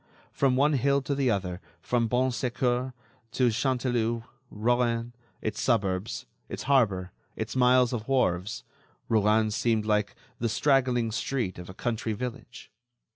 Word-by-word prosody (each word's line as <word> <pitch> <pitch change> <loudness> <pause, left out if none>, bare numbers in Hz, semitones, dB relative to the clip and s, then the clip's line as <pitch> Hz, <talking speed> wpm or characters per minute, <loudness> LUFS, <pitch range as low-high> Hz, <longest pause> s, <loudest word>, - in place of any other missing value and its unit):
From 135 -2 +2
one 145 +3 +3
hill 140 +1 +2
to 140 - -1
the 135 -2 +1
other, 95 -4 -2 0.2
from 120 -2 0
Bon 125 +3 +1
Secours 125 +1 -1 0.4
to 125 -2 +3
Canteleu, 120 -2 0 0.3
Rouen, 120 +1 0 0.3
its 110 -1 -2
suburbs, 100 -4 0 0.2
its - - -5
harbor, 100 -10 +2 0.2
its 110 +3 -4
miles 125 -1 +4
of 115 -2 -4
wharves, 105 -7 0 0.5
Rouen 110 0 +3
seemed 110 0 +1
like 105 -1 +1 0.2
the 115 - 0
straggling 125 -1 +2
street 115 -5 -2
of 90 - -9
a 95 - -9
country 115 -1 -2
village. 125 +3 -7
120 Hz, 135 wpm, -28 LUFS, 110-130 Hz, 0.5 s, miles